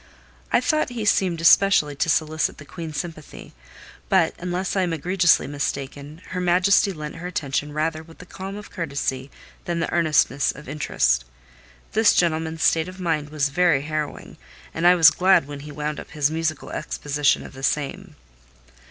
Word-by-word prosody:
I - - +4
thought 305 +4 +1
he 235 -3 -4
seemed 180 -5 +1
especially 170 -4 +5
to 145 - 0
solicit 155 0 0
the 145 - -12
Queen's 160 0 -7
sympathy; 160 -4 -8 0.6
but, 185 -4 +3
unless 180 +2 -3
I 190 - +2
am 175 -2 -1
egregiously 175 +2 +2
mistaken, 140 +2 -5
her 180 - -3
Majesty 185 +3 +3
lent 155 -3 -7
her 175 +2 -6
attention 145 -4 -2
rather 155 +1 -2
with 165 0 -16
the 180 - -12
calm 190 +2 -8
of 210 0 -10
courtesy 140 -4 -3 0.4
than 170 -1 -2
the 170 - -2
earnestness 155 -4 +2
of 150 - -13
interest. 65 - 0 0.7
This 220 0 +4
gentleman's 160 -1 0
state 160 0 +3
of 185 +1 -10
mind 160 -5 -1
was 150 -1 0
very 150 -2 +2
harrowing, 155 0 -5 0.4
and 165 +2 +2
I 180 - +7
was 160 -3 +7
glad 185 -5 +3
when 145 -1 -7
he 150 +1 -9
wound 150 +1 -4
up - - -10
his 150 -1 0
musical 160 -1 -3
exposition 145 -2 -1
of - - -11
the 135 - -11
same. 145 +1 -2
160 Hz, 170 wpm, -23 LUFS, 145-180 Hz, 0.7 s, I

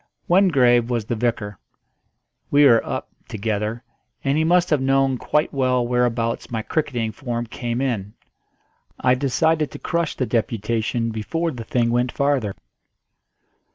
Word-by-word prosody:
Wingrave 130 - +4
was 120 -3 -1
the 120 - -2
vicar; 110 -3 -2 0.9
we 145 +1 +5
were 115 -4 +6
"up" - - -4 0.2
together, 110 +2 -3 0.4
and 135 0 +1
he 155 - +2
must 175 +2 +3
have 150 -3 +3
known 135 0 +2
quite 150 +1 0
well 130 -3 +1
whereabouts 120 -1 0
my 110 -2 -3
cricketing 120 -7 -1
form 120 -1 -4
came 120 +1 -4
in. 105 -7 -2 0.8
I 125 - +3
decided 150 +3 +1
to - - -9
crush 170 -2 -2
the 130 - -1
deputation 115 0 -1
before 165 +10 -2
the 120 -5 -7
thing 115 +1 0
went 120 +1 +1
farther. 140 -8 0
125 Hz, 140 wpm, -22 LUFS, 115-140 Hz, 0.9 s, were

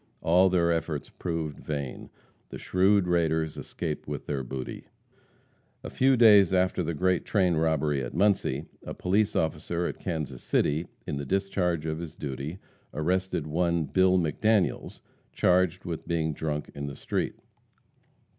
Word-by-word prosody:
All 90 +3 +4
their 85 -2 +2
efforts 80 -3 -2
proved 80 -4 -4
vain. 70 -4 -5 0.4
The - - -7
shrewd 95 +1 +3
raiders 80 -2 +1
escaped 80 -4 -5
with 75 -2 -5
their 70 -2 -2
booty. 65 0 -6 1.0
A - - -6
few 130 0 +3
days 105 -5 +7
after 90 -1 +2
the 85 -1 -2
great 90 +2 +1
train 95 -4 +2
robbery 80 -3 +1
at - - -6
Muncie, 100 +3 +1 0.2
a - - -6
police 100 +3 +1
officer 85 +2 -1
at - - -4
Kansas 75 -8 -4
City, 80 +4 0 0.2
in 70 - -3
the 70 - -3
discharge 90 -4 0
of 80 0 -2
his 85 -3 -7
duty, 70 +4 -5 0.4
arrested 90 +1 0
one 85 +1 +1
Bill 95 +4 +3
McDaniels, 95 +5 0 0.3
charged 90 0 +2
with 85 -3 -5
being 80 -2 0
drunk 75 0 -3
on 70 0 -4
the 70 - -6
street. - - -2
85 Hz, 145 wpm, -27 LUFS, 75-95 Hz, 1.0 s, days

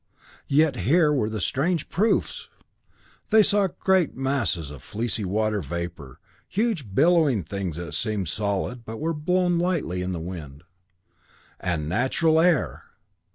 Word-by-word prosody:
Yet 145 -1 +3
here 150 - +3
were 125 -7 +1
the 110 -1 -4
strange 155 - 0
proofs! 210 +6 0 0.8
They 220 -1 +6
saw 200 -1 +3
great 185 -2 +1
masses 130 - -1
of 70 -3 -10
fleecy 110 - -2
water 105 +2 0
vapor, 80 -3 -6 0.3
huge 185 - -1
billowy 150 - +4
things 95 -1 -4
that 85 -3 -6
seemed 105 +2 -2
solid, 105 +6 -2
but 110 0 -7
were 165 +2 -1
blown 175 +3 +1
lightly 170 - -1
in 90 +1 -2
the 90 - -3
wind. 80 -4 -8 1.0
And 80 -5 -2
natural 130 - +2
air! 170 -4 +1
115 Hz, 135 wpm, -25 LUFS, -, 1.0 s, They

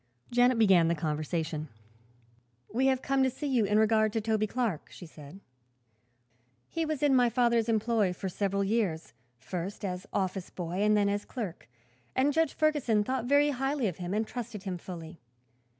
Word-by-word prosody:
Janet 245 0 +4
began 190 -7 +5
the 170 - +1
conversation. 155 0 -2 1.1
"We 260 +4 +2
have 265 -1 +1
come 275 -1 +1
to 265 - +4
see 265 +4 -6
you 255 -6 +2
in 210 +1 +2
regard 215 0 +3
to 225 - +1
Toby 215 0 0
Clark," 220 -8 -2
she - - -11
said. 155 +2 -12 1.3
"He 330 -1 -2
was 310 -2 -3
in 285 -2 +4
my 245 -2 +4
father's 235 -1 +2
employ 220 -3 +2
for 190 +2 -5
several 200 +1 -1
years, 195 -6 -1 0.2
first 180 - -5
as 185 +1 -4
office 190 -1 -2
boy 175 +1 -4
and 210 0 +4
then 205 -1 +3
as 205 0 -1
clerk, 210 -9 -6 0.5
and 275 +3 +2
Judge 320 -1 +1
Ferguson 280 -9 +2
thought 255 +1 -2
very 285 +3 +4
highly 270 0 -1
of 180 - -4
him 180 -1 -5
and 220 +1 +1
trusted 230 -4 -6
him 185 -3 -4
fully. 165 -2 -9
215 Hz, 175 wpm, -29 LUFS, 185-250 Hz, 1.3 s, began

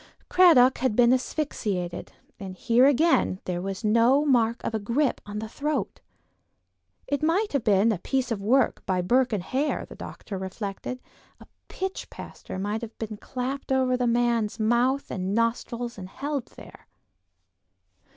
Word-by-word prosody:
Cradock 310 -9 +6
had 255 -4 0
been 245 +1 +5
asphyxiated; 210 - -2 0.3
and 190 -2 -7
here 240 +6 +4
again 285 - +3
there 175 -1 -2
was 195 +3 -5
no 230 +7 +4
mark 235 -4 +2
of - - -3
a 220 - 0
grip 240 +7 0
on 205 0 -6
the 220 +1 -4
throat. 285 -1 -3 1.0
It 285 +1 -2
might 350 +6 +1
have 280 -5 0
been 210 +2 +4
a 200 - -2
piece 260 +3 -1
of 210 -3 -2
work 245 +5 +2
by 185 -1 0
Burke 250 +7 +2
and 205 -5 -1
Hare, 270 +9 -1
the - - -12
doctor 195 -4 -8
reflected; 195 +5 -5 0.4
a - - -14 0.2
pitch 380 0 -5
plaster - - -9
might 205 +4 -2
have 230 -1 -8
been 215 -1 -5
clapped 260 +5 -5
over 260 -1 +2
the 250 -1 0
man's 235 -2 +1
mouth 240 +5 +1
and 190 +1 -2
nostrils 235 0 -1
and 185 -1 -8
held 280 +2 -4
there. - - -15
235 Hz, 160 wpm, -26 LUFS, 210-265 Hz, 1.0 s, Cradock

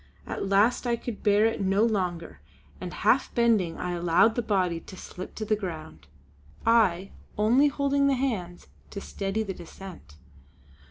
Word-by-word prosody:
At 195 - -4
last 210 +6 +3
I 235 - +2
could 235 -2 -7
bear 210 0 +4
it 225 - 0
no 195 +2 +2
longer, 180 -7 -2 0.4
and - - -5
half - - +1
bending 225 -8 +2
I 180 - -3
allowed 175 +5 +3
the 240 - -1
body 185 -6 0
to 185 - -12
slip 185 +1 -9
to 215 - -4
the 215 - +2
ground, 160 - -7 0.6
I 195 -5 +3 0.3
only 240 +7 +4
holding 280 0 +1
the 275 - +3
hands 205 -10 -3 0.2
to 200 - -6
steady 200 +2 -3
the 195 -3 -5
descent. 175 - -12
200 Hz, 160 wpm, -27 LUFS, 180-230 Hz, 0.6 s, bear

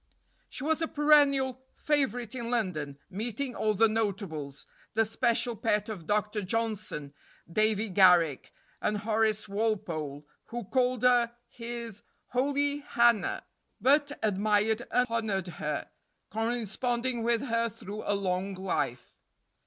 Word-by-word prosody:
She - - -6
was 320 +2 +1
a 325 - +1
perennial 280 -4 +4
favorite 245 -6 0
in 235 -2 -4
London, 170 - -1
meeting 240 +6 -3
all 215 -2 0
the 225 +3 +5
notables; 195 -10 -3 0.3
the 225 0 +4
special 235 +1 +1
pet 210 0 0
of 180 -7 -7
Dr. 210 0 0
Johnson, 200 -8 -2 0.3
Davy 215 +4 +1
Garrick, 180 -7 +4 0.3
and 210 - 0
Horace 215 0 +1
Walpole, 170 -9 -2 0.2
who 240 0 -5
called 250 +2 0
her 240 -1 +4
his 235 -3 -7 0.3
"holy 285 +3 +1
Hannah," 235 -6 +2 0.4
but 285 +2 +3
admired 215 +2 +1
and 250 - +3
honored 215 -5 -1
her, 150 -3 -4 0.4
corresponding 235 +2 -1
with 230 0 +1
her 230 -3 0
through 210 0 -8
a 205 - +2
long 190 0 -1
life. 185 -9 -3
220 Hz, 120 wpm, -29 LUFS, 195-245 Hz, 0.4 s, the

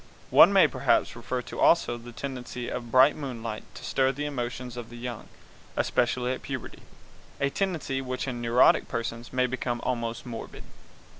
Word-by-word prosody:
One - - +9
may - - +6
perhaps - - +1
refer 125 -1 -3 0.2
also 165 -8 +4
to 120 - -11
the 120 - -9
tendency 125 -1 -5
of 120 -1 -5
bright 130 +4 +6
moonlight 115 -6 -5
to - - -10
stir 130 0 +2
the 145 +2 -4
emotions 125 -3 -4
of 120 -2 -7
the 120 - -10
young, 120 -2 -6 0.5
especially 125 +1 +1
at 130 - -6
puberty, 130 -4 -6 0.6
a 140 0 +1
tendency 160 -9 -1
which 130 0 -4
in 120 -2 -4
neurotic 120 +2 +4
persons 115 0 -4
may 125 0 +2
become 125 -1 -2
almost 115 -2 -2
morbid. 115 -2 -7
125 Hz, 165 wpm, -27 LUFS, 120-130 Hz, 0.6 s, One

